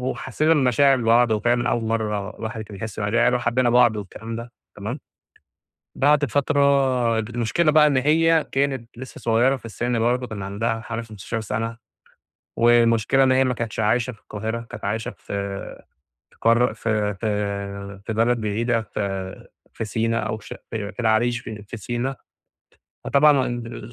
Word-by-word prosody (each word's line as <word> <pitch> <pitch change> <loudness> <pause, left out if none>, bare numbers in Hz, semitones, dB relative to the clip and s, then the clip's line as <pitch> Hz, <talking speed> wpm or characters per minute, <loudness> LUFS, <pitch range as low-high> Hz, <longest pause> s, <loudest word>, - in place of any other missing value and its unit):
وحسينا 130 +4 0
المشاعر 135 -1 +4
لبعض 115 0 +4
وفعلًا 120 +3 +1
أول 120 - 0
مرة 105 -2 -2
الواحد 110 0 -5
كان 105 -1 -10
يحس 110 0 -7
مشاعر، 105 +1 -1
يعني 125 +1 +4
وحبينا 120 0 +1
بعض 120 -3 +5
والكلام 110 +3 -7
ده 120 +1 -8 0.2
تمام؟ - - -5 1.0
بعد 145 +1 +4
فترة 135 -4 +2
المشكلة 120 +8 0
بقى 150 -1 +6
إن 140 - +2
هي 160 +4 +3
كانت 135 -4 -1
لسه 130 +1 -9
صغيرة 120 +4 +2
في 130 - -12
السّن 120 +1 -2
برضه 125 +2 +1
كان 100 -3 -6
عندها 110 +3 -2
حوالي 115 0 -5
15 110 +1 -5
سنة، 115 +2 -3 0.8
والمشكلة 115 +2 +4
إن 130 - +4
هي 130 +1 +4
ما 125 -1 0
كانتش 115 -1 -4
عايشة 120 +4 +1
في 105 - -18
القاهرة، 110 +3 -4
كانت - - -8
عايشة 110 +2 -2
في - - -30 1.1
في - - -26
قارة 115 0 +3
في 110 -2 -1
في 100 -1 -4
في 110 - -3
بلد 115 +2 +2
بعيدة 115 +2 0
في 95 -3 -5 0.3
في 115 - -4
سينا 115 +2 0
أو 110 0 -2
في 105 - -14
ش - - -7 0.2
في 105 -3 -4
العريش 115 +1 +2
في 105 -2 -8
في 105 +3 -8
سينا، 120 +5 -3 0.9
فطبعًا 140 -1 +4
ال 120 -1 -6
115 Hz, 160 wpm, -23 LUFS, 110-125 Hz, 1.1 s, بقى